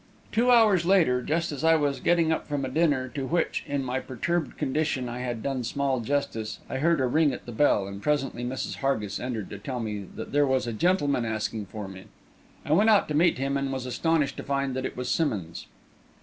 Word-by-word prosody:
Two 240 +3 +2
hours 220 -7 +5
later, 170 -9 +3
just 160 +6 -1
as 145 -1 -5
I 165 0 +6
was 145 -3 0
getting 170 -2 +2
up 160 - -1
from 145 -2 -2
a - - -3
dinner 145 -6 +1
to 135 +1 -4
which, 170 +2 0
in 140 -1 -1
my 130 0 -1
perturbed 160 +8 -2
condition, 145 -2 -1
I 120 +1 -5
had 120 -3 -4
done 135 -3 -2
small 135 +2 0
justice, 115 -3 -2
I - - -3
heard 165 +3 +2
a 130 - +2
ring 150 +4 +3
at - - -8
the 120 - -7
bell, 110 -5 +3
and 100 0 -7
presently 135 -3 -1
Mrs. 125 +2 -3
Hargis 110 -8 -1
entered 120 -5 -4
to 100 - -7
tell 125 +4 -4
me 105 -4 -4
that - - -7
there 145 0 +3
was 130 -1 +1
a 120 - -3
gentleman 145 - +1
asking 110 -2 -3
for 105 0 -6
me. 95 0 -10 0.6
I 150 - +1
went 210 +7 +5
out 210 -2 +5
to - - -1
meet 165 +3 +3
him, 135 +1 -1
and 140 -1 -2
was 130 -1 -3
astonished 150 +2 0
to - - -5
find 140 -1 -1
that 130 0 -1
it - - -11
was 125 0 -3
Simmonds. 105 - -1
135 Hz, 225 wpm, -27 LUFS, 120-155 Hz, 0.6 s, I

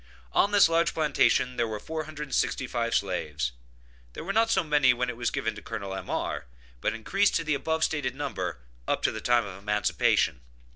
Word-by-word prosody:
On 200 - +4
this 205 -3 +7
large 165 +1 +1
plantation 125 -5 +2
there 120 -1 +1
were 110 -1 -4
465 145 -5 -2
slaves; 75 -9 -1 0.6
there - - -7
were 195 +4 -3
not 225 +1 +3
so 190 -4 +3
many 145 -5 +4
when 125 0 -1
it - - -9
was 120 0 -1
given - - -2
to - - -10
Col. 100 -1 -5
M.R., 95 - -3 0.3
but - - 0
increased 195 - +1
to 165 - +1
the 155 -1 0
above 160 +3 0
stated 135 -6 0
number, 145 - -3 0.3
up - - 0
to - - +3
the 110 - -6
time 120 -1 +3
of 95 -1 -8
emancipation. 105 - +1
125 Hz, 185 wpm, -27 LUFS, 110-160 Hz, 0.6 s, this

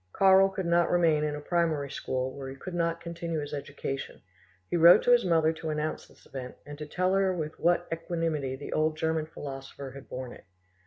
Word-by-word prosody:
Karl 195 0 +6
could 190 -1 -4
not 170 0 +3
remain 165 -4 +3
in 150 -1 -1
a - - -5
primary 155 -3 0
school 130 0 -2
where 135 -1 -6
he 135 - -8
could 180 +6 -8
not 170 -1 0
continue 170 -1 -4
his 145 -1 -6
education; 140 -1 -5 0.5
he - - -2
wrote 170 +1 +8
to 245 - +3
his 240 -1 +6
mother 160 -3 +3
to 160 0 -6
announce 155 0 -3
this - - -22
event 130 -1 -7
and 145 - -8
to 150 - -6
tell 185 +4 0
her 195 -1 +3
with 160 -4 -4
what 175 +1 +2
equanimity 165 -5 -2
the 140 +2 -7
old 155 0 +1
German 160 -1 0
philosopher 135 -2 -8
had 140 0 -12
borne 125 -1 -6
it. - - -15
160 Hz, 210 wpm, -29 LUFS, 140-170 Hz, 0.5 s, wrote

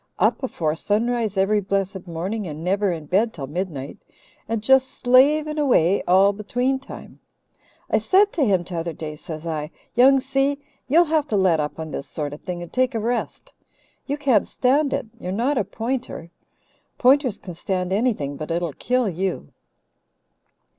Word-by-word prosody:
Up - - +2
afore 165 - -1
sunrise 220 +2 -1
every 205 +2 +2
blessed 195 -1 -2
morning 185 +5 -3
and 155 0 -7
never 195 +2 +1
in 160 -3 -5
bed 205 +9 +1
till 140 -5 -5
midnight, 150 -2 -5 0.5
and 225 -2 -2
just 265 +2 +5
slaving 300 +5 +3
away 200 - +3
all 190 +3 +5
between 245 +6 -1
time. 270 - -11 0.7
I - - +2
said 400 +2 +3
to 320 - +1
him 190 -7 +2
t'other 170 -1 -4
day, 155 0 -6
says 155 +1 -8
I: 155 -2 -3 0.2
'Young 265 +3 +6
Si, 270 +1 0 0.3
you'll 320 +6 +5
have 310 -2 +1
to 210 - 0
let 185 -4 +3
up 150 0 -3
on 160 -1 -6
this 140 - -5
sort 145 -2 -4
of 150 - -10
thing 175 -2 -5
and 175 - -12
take 255 -1 +1
a - - 0
rest. 235 +3 -3 0.5
You 285 +1 -1
can't 265 -8 +2
stand 275 +3 +1
it. - - -1
You're 180 - -5
not 245 +7 0
a - - +1
Pointer. 225 -4 -4 0.7
Pointers 260 -3 +3
can 180 - -9
stand 180 +2 -2
anything, 195 - 0
but 155 - -6
it'll 170 -2 -1
kill 250 - 0
you.' 185 - -3
205 Hz, 170 wpm, -23 LUFS, 170-255 Hz, 0.7 s, Young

